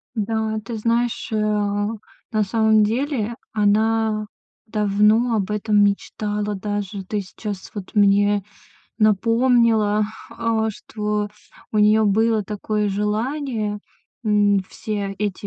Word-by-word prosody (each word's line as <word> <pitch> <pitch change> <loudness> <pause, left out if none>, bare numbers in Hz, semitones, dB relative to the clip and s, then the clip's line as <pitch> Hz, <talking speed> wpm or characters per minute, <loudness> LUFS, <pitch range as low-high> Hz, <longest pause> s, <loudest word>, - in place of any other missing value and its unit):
Да, 220 0 -1
ты 235 - -5
знаешь, 230 +2 0
э, - - 0
на 210 +1 -1
самом 220 +1 +3
деле 235 0 -1 0.2
она 215 0 +2 0.4
давно 215 +2 +2
об 205 -1 -1
этом 210 0 +2
мечтала 205 +1 -1
даже. 205 0 -4
Ты 210 +1 -2
сейчас 200 0 -7
вот 200 -3 -7
мне 205 0 +4 0.6
напомнила, 225 0 +3 0.3
а, 225 -1 0
что 210 0 -3 0.4
у 215 - +1
неё 215 +1 +5
было 220 +1 +2
такое 210 +1 -2
желание, 215 +1 -2 0.4
м, 205 -1 +3
все 200 -2 -4
эти 205 -1 -3
210 Hz, 110 wpm, -22 LUFS, 205-220 Hz, 0.6 s, неё